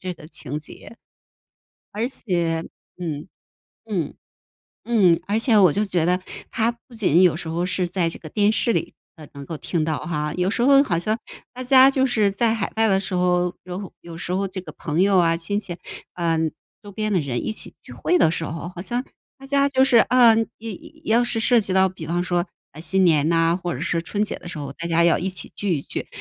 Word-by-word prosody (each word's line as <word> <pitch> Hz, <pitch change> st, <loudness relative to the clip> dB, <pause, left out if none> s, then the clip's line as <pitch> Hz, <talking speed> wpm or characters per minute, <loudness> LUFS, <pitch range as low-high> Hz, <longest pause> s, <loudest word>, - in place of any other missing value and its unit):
这 185 Hz, -1 st, -4 dB
个 155 Hz, -, -13 dB
情 150 Hz, -3 st, -5 dB
节。 190 Hz, +8 st, -11 dB, 1.0 s
而 225 Hz, +4 st, -1 dB
且 170 Hz, -9 st, -1 dB, 0.3 s
嗯， 160 Hz, -2 st, -4 dB, 0.6 s
嗯， 180 Hz, -9 st, -2 dB, 0.7 s
嗯， 190 Hz, -8 st, +4 dB
而 210 Hz, -, +1 dB
且 225 Hz, -1 st, +3 dB
我 180 Hz, -6 st, +6 dB
就 210 Hz, +1 st, +1 dB
觉 180 Hz, -5 st, 0 dB
得 180 Hz, +1 st, +2 dB, 0.3 s
它 230 Hz, +1 st, +1 dB, 0.2 s
不 245 Hz, -, -15 dB
仅 185 Hz, -4 st, +3 dB
有 175 Hz, -4 st, +4 dB
时 165 Hz, -, -7 dB
候 170 Hz, +2 st, -1 dB
是 185 Hz, -1 st, 0 dB
在 175 Hz, -1 st, 0 dB
这 -, -, -8 dB
个 155 Hz, -, -10 dB
电 205 Hz, +5 st, +2 dB
视 230 Hz, +2 st, +1 dB
里 -, -, -2 dB, 0.4 s
能 140 Hz, -, -8 dB
够 160 Hz, +3 st, -6 dB
听 165 Hz, -4 st, -1 dB
到 155 Hz, -2 st, -1 dB
哈， 150 Hz, -3 st, -3 dB
有 180 Hz, +1 st, +1 dB
时 235 Hz, -, -1 dB
候 275 Hz, +1 st, +6 dB
好 175 Hz, -9 st, 0 dB
像 215 Hz, +6 st, -1 dB, 0.3 s
大 255 Hz, 0 st, -7 dB
家 265 Hz, +1 st, +7 dB
就 265 Hz, -1 st, +2 dB
是 215 Hz, -5 st, +2 dB
在 225 Hz, +3 st, +1 dB
海 220 Hz, -3 st, -3 dB
外 225 Hz, 0 st, +3 dB
的 195 Hz, -1 st, +3 dB
时 195 Hz, -1 st, -4 dB
候， 180 Hz, 0 st, +2 dB
有 180 Hz, +1 st, -7 dB
有 170 Hz, -1 st, -10 dB
时 170 Hz, -, -6 dB
候 195 Hz, +1 st, 0 dB
这 190 Hz, 0 st, -6 dB
个 -, -, -10 dB
朋 165 Hz, +4 st, 0 dB
友 195 Hz, -1 st, +4 dB
啊、 165 Hz, -1 st, +3 dB
亲 190 Hz, +5 st, 0 dB
戚， 180 Hz, -4 st, -5 dB, 0.4 s
呃， 165 Hz, -2 st, 0 dB, 0.4 s
周 205 Hz, -1 st, -11 dB
边 215 Hz, 0 st, -2 dB
的 185 Hz, -, +3 dB
人 130 Hz, -4 st, -3 dB
一 -, -, -2 dB
起 -, -, -6 dB
聚 -, -, -15 dB
会 360 Hz, -, +1 dB
的 160 Hz, -, +4 dB
时 165 Hz, -, -3 dB
候， 165 Hz, +2 st, -5 dB
好 175 Hz, -, -7 dB
像 240 Hz, +6 st, -2 dB, 0.3 s
大 270 Hz, -, -14 dB
家 280 Hz, 0 st, +2 dB
就 265 Hz, -1 st, +2 dB
是， 260 Hz, -3 st, +3 dB
呃， 235 Hz, -2 st, +6 dB, 0.2 s
要 315 Hz, +2 st, -3 dB
要 245 Hz, -, +3 dB
是 230 Hz, -2 st, -1 dB
涉 240 Hz, +1 st, +4 dB
及 195 Hz, -2 st, -3 dB
到 190 Hz, 0 st, +4 dB
比 175 Hz, -4 st, -9 dB
方 175 Hz, +2 st, 0 dB
说， 175 Hz, 0 st, 0 dB, 0.2 s
啊， 155 Hz, -, -11 dB
新 190 Hz, +3 st, +1 dB
年 155 Hz, -3 st, +4 dB
呐， 165 Hz, +1 st, +2 dB
或 175 Hz, -4 st, -3 dB
者 130 Hz, -, -6 dB
是 170 Hz, 0 st, 0 dB
春 205 Hz, +4 st, -2 dB
节 -, -, -4 dB
的 -, -, -13 dB
时 175 Hz, -, -7 dB
候， 140 Hz, -1 st, -5 dB
大 170 Hz, -, -5 dB
家 170 Hz, 0 st, +3 dB
要 170 Hz, -, +4 dB
一 190 Hz, -, -2 dB
起 185 Hz, -3 st, -5 dB
聚 195 Hz, -4 st, 0 dB
一 140 Hz, -, -3 dB
聚， -, -, -5 dB
185 Hz, 245 characters per minute, -22 LUFS, 170-220 Hz, 1.0 s, 家